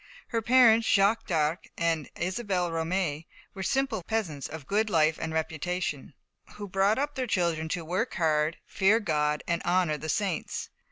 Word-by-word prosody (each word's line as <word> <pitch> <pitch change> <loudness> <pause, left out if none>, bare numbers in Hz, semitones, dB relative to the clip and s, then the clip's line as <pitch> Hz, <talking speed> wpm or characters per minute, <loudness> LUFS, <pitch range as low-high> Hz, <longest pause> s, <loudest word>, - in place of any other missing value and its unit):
Her 230 -2 0
parents, 230 -1 +5
Jacques 200 +2 +3
d'Arc 160 -1 0
and 165 -3 0
Isabelle 185 -1 -1
Romée, 165 -1 -2 0.3
were 190 - -7
simple 265 -1 0
peasants, 170 -8 -3
"of 155 -2 -8
good 215 +7 +1
life 155 -3 +2
and 160 - -3
reputation," 160 -2 -3 0.4
who 205 -1 -6
brought 195 +3 +2
up 290 +2 -1
their 260 -3 -3
children 170 -6 0
to 165 0 -3
work 185 +9 -2
hard, 155 -2 +1
fear 205 +4 +3
God 150 -6 0
and 170 -1 0
honour 175 -4 +1
the 160 - -6
saints. 200 -5 -2
180 Hz, 160 wpm, -28 LUFS, 160-210 Hz, 0.4 s, parents